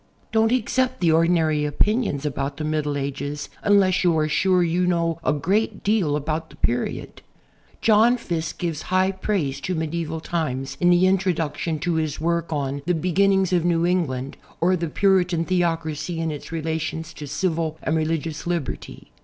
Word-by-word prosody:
Don't 225 0 +3
accept 255 +1 +1
the 170 -3 +3
ordinary 160 -2 +3
opinions 150 - 0
about 140 0 -3
the 155 - -4
Middle 150 -1 -1
Ages 140 +1 -4
unless 195 -3 +3
you 170 -3 +3
are 155 -1 +2
sure 180 +4 +3
you 175 +2 +1
know 170 -2 0
a - - +2
great 195 +9 0
deal 200 -8 +2
about 155 +2 -3
that - - -17
period. 120 +1 -2 0.6
John 225 +3 +5
Fiske 165 -8 -4
gives 165 -4 -3
high 185 +1 +3
i)raise 185 -8 -2
to 185 - -2
medieval 160 0 -3
times 135 -5 -3
in 175 - +4
the 175 +1 +5
introduction 175 -4 0
to 175 0 0
his 155 -2 -3
work 170 +1 -1
on 140 -2 -2
"The 180 - +2
Beginnings 190 +2 +2
of 175 -2 +3
New 170 -1 +2
England, 140 -8 -1 0.2
or 180 +2 +3
the 170 -1 -2
Puritan 180 -2 +2
Theocracy 165 -2 -1
in 165 -1 -1
Its 150 +1 -8
Relations 160 0 -3
to 150 - -8
Civil 160 0 -1
and 160 - 0
Religious 160 0 -2
Liberty." 170 -5 -4
165 Hz, 165 wpm, -23 LUFS, 155-185 Hz, 0.6 s, John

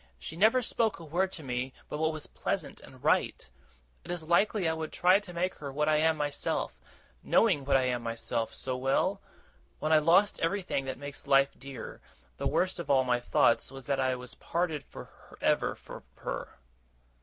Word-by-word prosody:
She 65 - -7
never 220 +8 +4
spoke 225 -4 0
a 165 - -9
word 180 +5 0
to 160 - -6
me 125 0 -3
but 150 - -5
what 160 0 +2
was 155 -1 -6
pleasant - - -4
and - - -15
right. - - +1 0.6
Is 175 -2 -4
it - - -13
likely 195 +2 +3
I 160 - +2
would 160 -1 -4
try 185 +2 +4
to 205 -3 -10
make 180 +2 -1
her 140 -2 -5
what 150 +2 0
I 155 -1 +4
am 160 +1 +3
myself, 145 - -2 0.4
knowing 175 -12 +3
what 135 -1 +4
I 130 - +1
am 125 -1 0
myself, 115 0 -2
so 130 -1 -3
well? 135 +2 +1 0.6
When 155 +1 0
I 155 - +7
lost 180 +7 +4
everything 170 -5 -1
that 130 -1 -4
makes 145 +1 -7
life 135 0 +5
dear, 135 -1 -9 0.4
the 140 - -1
worst 175 +6 0
of 170 - -6
all 135 -2 +5
my 125 -1 +1
thoughts 120 -1 +2
was 135 -1 -9
that 140 0 0
I 130 -1 +2
was 125 -1 -8
parted 165 -3 -2
for - - -13
ever - - +1
from - - -11
her! - - -6
150 Hz, 195 wpm, -30 LUFS, 135-175 Hz, 0.6 s, I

